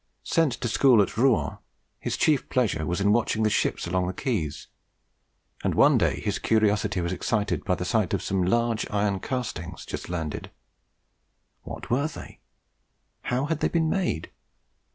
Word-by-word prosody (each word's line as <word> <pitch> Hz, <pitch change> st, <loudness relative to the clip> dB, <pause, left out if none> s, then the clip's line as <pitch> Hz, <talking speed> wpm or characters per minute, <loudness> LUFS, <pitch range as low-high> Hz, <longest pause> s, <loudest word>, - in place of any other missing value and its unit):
Sent 160 Hz, -6 st, +2 dB
to 120 Hz, -, -3 dB
school 125 Hz, +1 st, +5 dB
at 100 Hz, -, +2 dB
Rouen, 125 Hz, -1 st, +2 dB, 0.4 s
his -, -, -3 dB
chief 150 Hz, -4 st, +2 dB
pleasure 100 Hz, -11 st, 0 dB
was 90 Hz, +1 st, -1 dB
in 100 Hz, +1 st, +3 dB
watching 110 Hz, -1 st, +1 dB
the 110 Hz, -, +2 dB
ships -, -, 0 dB
along 90 Hz, +1 st, 0 dB
the 95 Hz, -, -2 dB
quays; 95 Hz, -, -2 dB, 1.0 s
and -, -, 0 dB
one -, -, +5 dB
day -, -, +1 dB
his -, -, -2 dB
curiosity 105 Hz, -3 st, +1 dB
was 85 Hz, +1 st, -1 dB
excited 105 Hz, +2 st, -1 dB
by 90 Hz, -, +1 dB
the 90 Hz, -, -4 dB
sight 110 Hz, -2 st, +1 dB
of -, -, -4 dB
some 95 Hz, -1 st, 0 dB
large 115 Hz, +4 st, +1 dB
iron 100 Hz, -2 st, 0 dB
castings 90 Hz, -, -4 dB
just -, -, -6 dB
landed. 80 Hz, -4 st, -4 dB, 1.1 s
What -, -, -8 dB
were 140 Hz, +5 st, +2 dB
they? 155 Hz, -, -10 dB, 0.9 s
How 125 Hz, +3 st, 0 dB
had 155 Hz, 0 st, -1 dB
they -, -, +1 dB
been 160 Hz, -2 st, +1 dB
made? 180 Hz, -, -1 dB
105 Hz, 165 wpm, -26 LUFS, 90-125 Hz, 1.1 s, school